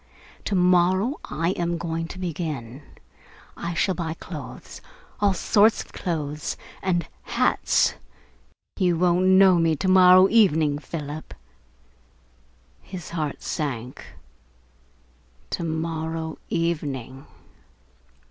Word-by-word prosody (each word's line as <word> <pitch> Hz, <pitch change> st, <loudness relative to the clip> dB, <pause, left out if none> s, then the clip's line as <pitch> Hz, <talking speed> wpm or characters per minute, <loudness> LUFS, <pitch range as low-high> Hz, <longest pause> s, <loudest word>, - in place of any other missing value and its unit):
To 200 Hz, -, -1 dB
morrow 185 Hz, -, +3 dB
I 165 Hz, +5 st, -1 dB
am 175 Hz, -2 st, -2 dB
going 165 Hz, -1 st, -3 dB
to 180 Hz, -, -9 dB
begin. 150 Hz, -8 st, -5 dB, 0.7 s
I 170 Hz, 0 st, -4 dB
shall 190 Hz, +2 st, +1 dB
buy 165 Hz, -3 st, -4 dB
clothes -, -, -9 dB, 0.4 s
all 200 Hz, -2 st, +2 dB
sorts 210 Hz, +5 st, +3 dB
of -, -, -22 dB
clothes 150 Hz, -4 st, -3 dB, 0.2 s
and 175 Hz, -2 st, 0 dB
hats. -, -, +2 dB, 0.9 s
You 180 Hz, -3 st, +2 dB
won't 180 Hz, +1 st, +3 dB
know 190 Hz, -1 st, +6 dB
me 165 Hz, -1 st, +2 dB
to 190 Hz, -, -3 dB
morrow 185 Hz, 0 st, +7 dB
evening, 160 Hz, -10 st, +3 dB
Philip." 150 Hz, -1 st, -7 dB, 1.5 s
His 180 Hz, -4 st, -9 dB
heart 155 Hz, -4 st, -3 dB
sank. 130 Hz, -6 st, -4 dB, 1.5 s
To -, -, -2 dB
morrow 160 Hz, 0 st, -3 dB
evening! 140 Hz, -6 st, -3 dB
170 Hz, 100 wpm, -24 LUFS, 155-185 Hz, 1.5 s, morrow